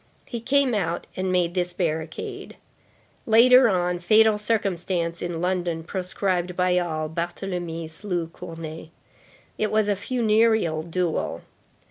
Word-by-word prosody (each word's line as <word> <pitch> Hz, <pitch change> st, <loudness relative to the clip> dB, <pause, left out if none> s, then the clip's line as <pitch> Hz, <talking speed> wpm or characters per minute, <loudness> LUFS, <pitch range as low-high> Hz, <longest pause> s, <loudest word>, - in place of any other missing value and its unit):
He 235 Hz, -2 st, -6 dB
came 275 Hz, +1 st, +2 dB
out 175 Hz, -5 st, -1 dB
and 185 Hz, 0 st, -1 dB
made 175 Hz, -2 st, +1 dB
this 180 Hz, -1 st, -1 dB
barricade. 160 Hz, -3 st, -4 dB, 0.7 s
Later 245 Hz, +2 st, +7 dB
on, 180 Hz, -2 st, 0 dB
fatal 215 Hz, +4 st, +4 dB
circumstance, 185 Hz, -5 st, -1 dB
in 170 Hz, -1 st, -3 dB
London, 175 Hz, -3 st, -1 dB
proscribed 180 Hz, 0 st, -2 dB
by 180 Hz, 0 st, +2 dB
all, 155 Hz, -3 st, -2 dB
Barthélemy 170 Hz, 0 st, -4 dB
slew 175 Hz, +1 st, -3 dB
Cournet. 165 Hz, -1 st, -8 dB, 0.7 s
It 215 Hz, -, +1 dB
was 215 Hz, -1 st, +2 dB
a 205 Hz, -, +2 dB
funereal 220 Hz, -6 st, +2 dB
duel. 170 Hz, 0 st, -2 dB
180 Hz, 120 wpm, -24 LUFS, 170-210 Hz, 0.7 s, Later